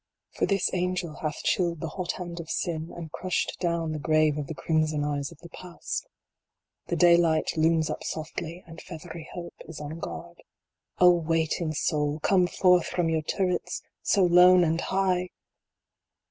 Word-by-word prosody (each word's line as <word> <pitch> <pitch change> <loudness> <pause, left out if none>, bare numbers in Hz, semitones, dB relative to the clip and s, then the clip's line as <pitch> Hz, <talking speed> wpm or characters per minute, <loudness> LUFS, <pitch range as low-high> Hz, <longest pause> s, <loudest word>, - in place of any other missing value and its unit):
For - - -1
this 195 -2 +1
Angel 180 -2 -1
hath 155 -1 -4
chilled 170 -3 +1
the 165 -1 -4
hot 180 +2 -3
hand 175 -1 -6
of 165 -1 -8
Sin, 165 -2 -2
and 165 -3 -7
crushed 185 +2 -2
down 170 -2 -1
the 155 - -3
grave 155 0 +3
of 145 -2 -4
the 160 - -6
crimson 155 +1 0
eyes 145 0 -2
of 170 - -14
the 170 - -11
Past 180 0 -6 0.8
The - - -1
daylight 170 -2 +4
looms 160 0 +3
up - - -4
softly, 165 +2 -5
and 165 -1 -11
feathery 165 -2 -9
Hope 175 -1 -7
is 165 - -8
on 150 +2 -6
guard. 170 0 -8 0.6
O 180 0 +7
waiting 165 -1 0
Soul, 150 -1 0
come 180 +1 +3
forth 180 -1 +3
from 175 -2 0
your 160 -1 +1
turrets, 180 +3 -2 0.2
so 200 - +3
lone 180 +1 +7
and 165 0 +1
high! 185 -2 0
170 Hz, 165 wpm, -27 LUFS, 155-180 Hz, 0.8 s, O